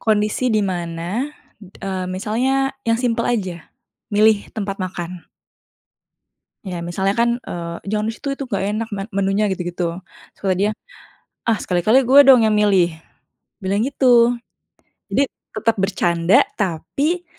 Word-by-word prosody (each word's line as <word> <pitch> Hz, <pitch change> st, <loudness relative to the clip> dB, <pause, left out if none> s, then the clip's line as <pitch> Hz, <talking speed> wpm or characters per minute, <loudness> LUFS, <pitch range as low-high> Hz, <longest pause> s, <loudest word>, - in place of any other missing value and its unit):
Kondisi 215 Hz, +3 st, +1 dB
di 215 Hz, -2 st, +2 dB
mana, 175 Hz, +5 st, -3 dB, 0.3 s
eee, 190 Hz, -1 st, -5 dB
misalnya 245 Hz, +8 st, 0 dB, 0.2 s
yang 230 Hz, -, +3 dB
simpel 230 Hz, -1 st, 0 dB
aja, 185 Hz, -8 st, -2 dB, 0.4 s
milih 215 Hz, 0 st, +3 dB
tempat 200 Hz, -2 st, -3 dB
makan. 180 Hz, -1 st, -5 dB, 1.4 s
Ya, 180 Hz, -3 st, -5 dB
misalnya 190 Hz, +3 st, 0 dB
kan, 235 Hz, 0 st, +3 dB
eee, 170 Hz, -1 st, -5 dB
"Jangan 215 Hz, 0 st, 0 dB
di 225 Hz, -, -2 dB
situ, 280 Hz, -, -7 dB
itu 275 Hz, -, -4 dB
nggak 200 Hz, -5 st, -2 dB
enak 220 Hz, +1 st, -3 dB
men 195 Hz, 0 st, -4 dB
menunya." 200 Hz, +1 st, +1 dB
Gitu-gitu. 175 Hz, -1 st, -3 dB, 0.3 s
Terus -, -, -30 dB
kata 185 Hz, -, +3 dB
dia, 210 Hz, -, +3 dB, 0.8 s
"Ah, 230 Hz, -, +4 dB
sekali-kali 215 Hz, +9 st, +3 dB
gue 265 Hz, +3 st, +7 dB
dong 255 Hz, -4 st, +8 dB
yang 220 Hz, -, +3 dB
milih!" 195 Hz, -4 st, +4 dB, 0.7 s
Bilang 195 Hz, +3 st, 0 dB
gitu. 245 Hz, -3 st, +4 dB, 0.8 s
Jadi, 280 Hz, -, +2 dB, 0.3 s
tetep 220 Hz, +1 st, +1 dB
bercanda 185 Hz, +1 st, +2 dB, 0.2 s
tapi 275 Hz, -, -1 dB
205 Hz, 135 wpm, -20 LUFS, 185-230 Hz, 1.4 s, dong